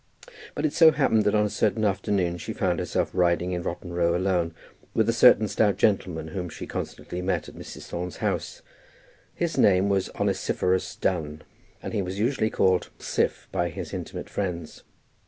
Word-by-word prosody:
But 155 - -1
it 150 - 0
so 165 -1 +8
happened 130 -8 +2
that 105 - +3
on 105 0 +3
a - - -1
certain 110 0 +1
afternoon 95 -3 0
she - - -5
found - - 0
herself - - -1
riding 90 0 +2
in 90 -1 -2
Rotten 85 +1 -5
Row 85 0 +2
alone 90 -3 0 0.4
with 110 -1 +3
a 115 - +3
certain 115 -2 +6
stout 100 -2 +2
gentleman 90 -7 +1
whom 90 0 -4
she - - -7
constantly 90 - -5
met 95 +1 -1
at - - -11
Mrs. - - -9
Thorne's 90 +1 -5
house. - - -3 0.7
His - - -1
name 95 0 +4
was 95 -1 +1
Onesiphorus 95 0 0
Dunn, 80 -4 -2 0.4
and - - -5
he 105 - +1
was 95 +1 -4
usually 110 0 +1
called 95 -3 +2
Siph - - -1
by 85 - 0
his 95 +4 -7
intimate 90 -3 -5
friends. 85 -5 -4
95 Hz, 175 wpm, -26 LUFS, 85-105 Hz, 0.7 s, so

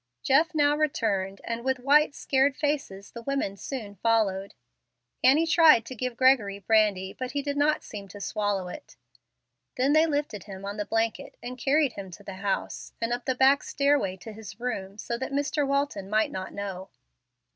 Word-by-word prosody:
Jeff 315 +5 +3
now 290 -1 +4
returned, 205 -10 -1
and, 230 0 -4
with 265 0 +1
white, 285 +3 +3
scared 270 0 +1
faces, 285 -10 -2
the 235 - -8
women 275 -6 -2
soon 215 -1 -6
followed. 200 -3 +1 0.7
Annie 295 +5 +5
tried 320 -8 +6
to 255 - -7
give 250 0 -4
Gregory 250 -7 +4
brandy, 200 -2 +2
but 255 0 -6
he 285 -1 -1
did 285 0 -2
not 295 +1 +2
seem 200 -2 -8
to 205 +2 -11
swallow 200 -2 -1
it. 280 +11 -10 0.8
They 255 +1 +1
then 315 +1 +4
lifted 285 - -2
him 195 -1 -9
on 200 +1 -5
the 210 - -2
blanket 225 +1 -2
and 250 +1 -5
carried 280 +1 +2
him 195 -1 -8
to 185 +3 -12
the 195 -1 -8
house, 200 -1 -3
and 230 +1 -1
up 245 0 -4
the 260 - 0
back 270 +2 +5
stairway 280 -10 +1
to 220 +4 -10
his 210 -1 -10
room, 205 -5 -4
so 235 +2 -4
that 265 - -4
Mr. 285 +1 0
Walton 280 -9 -1
might 215 +1 +2
not 185 0 -5
know. 195 -1 -6
235 Hz, 185 wpm, -27 LUFS, 200-280 Hz, 0.8 s, tried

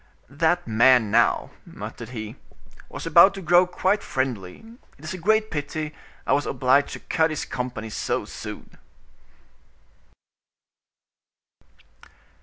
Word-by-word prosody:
"That 165 +5 +1
man, 115 0 +4
now," 115 +1 +2
muttered 115 - -9
he, 110 -2 -7 0.5
"was - - -8
about 185 +3 +6
to 195 - -7
grow 175 +2 +5
quite 190 +3 0
friendly; 125 - -4 0.3
it 145 - -19
is 155 - -4
a - - -5
great 215 +4 +1
pity 150 +1 -4 0.3
I - - +2
was 145 - +1
obliged 135 +2 +2
to - - -7
cut 160 0 +1
his 155 - -4
company 120 -3 -5
so - - -2
soon." - - -9
145 Hz, 120 wpm, -24 LUFS, 120-175 Hz, 0.5 s, about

